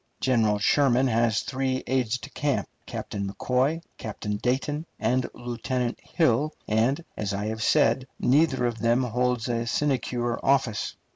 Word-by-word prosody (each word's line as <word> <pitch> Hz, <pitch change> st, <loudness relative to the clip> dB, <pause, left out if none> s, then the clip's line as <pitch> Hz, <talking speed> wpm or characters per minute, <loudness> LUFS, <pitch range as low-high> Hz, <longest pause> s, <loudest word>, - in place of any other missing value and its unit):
General 115 Hz, -5 st, +2 dB
Sherman 130 Hz, +4 st, +3 dB
has 115 Hz, -3 st, +2 dB
three 130 Hz, -1 st, -2 dB
aides 125 Hz, -2 st, 0 dB
de 110 Hz, -, -10 dB
camp, 145 Hz, -1 st, -1 dB, 0.2 s
Captain 100 Hz, -3 st, -4 dB
McCoy, 130 Hz, +10 st, 0 dB, 0.2 s
Captain 105 Hz, -1 st, -4 dB
Dayton, 140 Hz, +7 st, -1 dB
and 125 Hz, +3 st, +1 dB
Lieutenant 120 Hz, 0 st, -3 dB
Hill, 150 Hz, -1 st, +1 dB
and, 120 Hz, +9 st, +1 dB
as 100 Hz, -2 st, -2 dB
I 100 Hz, +1 st, -2 dB
have 110 Hz, 0 st, -3 dB
said, 115 Hz, +4 st, +3 dB
neither 135 Hz, -1 st, +3 dB
of 120 Hz, -1 st, -2 dB
them 120 Hz, +4 st, +2 dB
holds 125 Hz, 0 st, 0 dB
a 120 Hz, -1 st, -1 dB
sinecure 125 Hz, -3 st, 0 dB
office. 135 Hz, -6 st, +1 dB
125 Hz, 140 wpm, -26 LUFS, 115-130 Hz, 0.2 s, Sherman